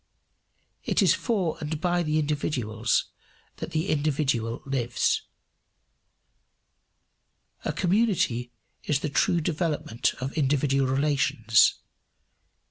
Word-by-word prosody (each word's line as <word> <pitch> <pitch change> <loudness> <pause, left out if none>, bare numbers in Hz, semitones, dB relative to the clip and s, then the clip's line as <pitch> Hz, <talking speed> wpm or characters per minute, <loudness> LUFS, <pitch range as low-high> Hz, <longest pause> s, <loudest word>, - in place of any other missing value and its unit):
It - - +2
is - - +5
for 190 -9 -1
and 150 0 -3
by 175 +1 +1
the 155 -2 0
individuals 130 -7 -1 0.5
that - - -5
the 160 +5 -2
individual 140 -6 0
lives. 130 -3 0 2.4
A - - 0
community 180 - +1 0.3
is 145 -2 0
the 150 - -2
true 170 +4 +2
development 150 -7 -1
of 130 +2 -5
individual 135 -2 +1
relations. 135 -5 +3
145 Hz, 95 wpm, -26 LUFS, 130-160 Hz, 2.4 s, is